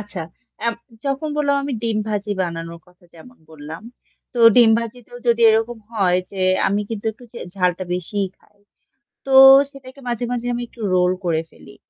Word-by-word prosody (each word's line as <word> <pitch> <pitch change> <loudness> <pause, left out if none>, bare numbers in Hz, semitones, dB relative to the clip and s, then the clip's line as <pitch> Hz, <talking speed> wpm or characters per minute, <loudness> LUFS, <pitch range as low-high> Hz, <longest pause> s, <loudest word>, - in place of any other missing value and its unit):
আচ্ছা 205 -3 -8 0.5
এব 230 - -1 0.3
যখন 275 +2 -2
বললাম 285 -1 +1
আমি 280 0 -4
ডিম 225 -2 0
ভাজি 210 -1 -3
বানানোর 170 -1 -5
কথা 180 +1 -25
যেমন 245 +10 -16
বললাম। 155 +3 -10 0.5
তো 245 - -6 0.2
ডিম 235 -2 +7
ভাজিতেও 240 +1 -8
যদি 235 0 +2
এরকম 225 +2 0
হয় 185 -5 +2
যে 195 - -7 0.3
আমি 200 +2 +1
কিন্তু 220 -3 -6
একটু 245 - -17
যে 240 - -8 0.2
ঝালটা 180 -1 0
বেশিই 190 +2 -3
খাই। 205 - -31 0.7
তো - - -5 0.4
সেটাকে 275 0 -14
মাঝে, 240 0 -2
মাঝে 245 -1 -3
আমি 240 - -3
একটু 235 - -18
রোল 180 0 +3
করে 165 -2 0
ফেলি। 135 - -16
215 Hz, 170 wpm, -20 LUFS, 180-245 Hz, 0.7 s, ডিম